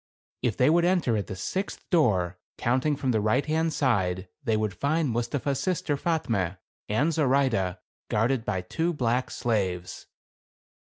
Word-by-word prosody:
JK'If 120 -5 0
they 125 - +4
would 170 +1 +4
enter 175 -10 +2
at 100 -3 -2
the - - -5
sixth 190 - -4
door, 95 - +2 0.2
counting 130 +5 +1
from 135 -2 -1
the 110 -3 +1
right 110 +7 +2
hand 160 +1 +1
side, 95 -10 0 0.2
they 110 -2 +1
would 105 -2 -1
find 150 - 0
Mustapha's 125 +4 -1
sister 180 -5 0
Fatme? 115 - -1 0.3
and 140 +10 +2
Zoraide, 130 - +2 0.3
guarded 115 +3 +1
by 95 -4 -1
two 165 - -1
black 125 -3 0
slaves. 95 -6 -2
125 Hz, 150 wpm, -27 LUFS, 105-150 Hz, 0.3 s, they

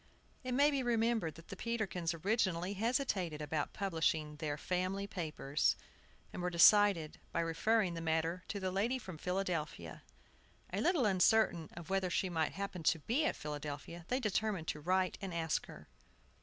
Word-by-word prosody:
It 255 -1 -2
may 290 +2 +5
be 275 -2 0
remembered 230 -7 +1
that 165 - -14
the 195 - -6
Peterkins 195 -7 -2
originally 185 0 0
hesitated 205 - 0
about 150 0 -2
publishing 160 -5 -1
their 150 -1 -3
Family 185 +4 -1
Papers, 155 -6 0 0.6
and - - -5
were 180 - 0
decided 175 -2 +5
by 170 - 0
referring 180 +4 +1
the 165 - -5
matter 165 +2 0
to 205 - -3
the 185 -1 -2
lady 220 +7 +1
from 185 -10 -9
Philadelphia. 180 -4 -3 0.7
A - - 0
little 340 -8 +3
uncertain 190 -3 +3
of 170 +2 -9
whether 190 -1 +1
she 185 +1 0
might 160 -2 0
happen 195 -3 -4
to 165 +1 +3
be 240 - 0
at - - +1
Philadelphia, 150 +3 -6
they 255 - 0
determined 215 -6 -1
to 150 - -3
write 185 +2 +1
and 190 -3 -4
ask 160 -1 -1
her. - - -12
185 Hz, 165 wpm, -35 LUFS, 160-215 Hz, 0.7 s, may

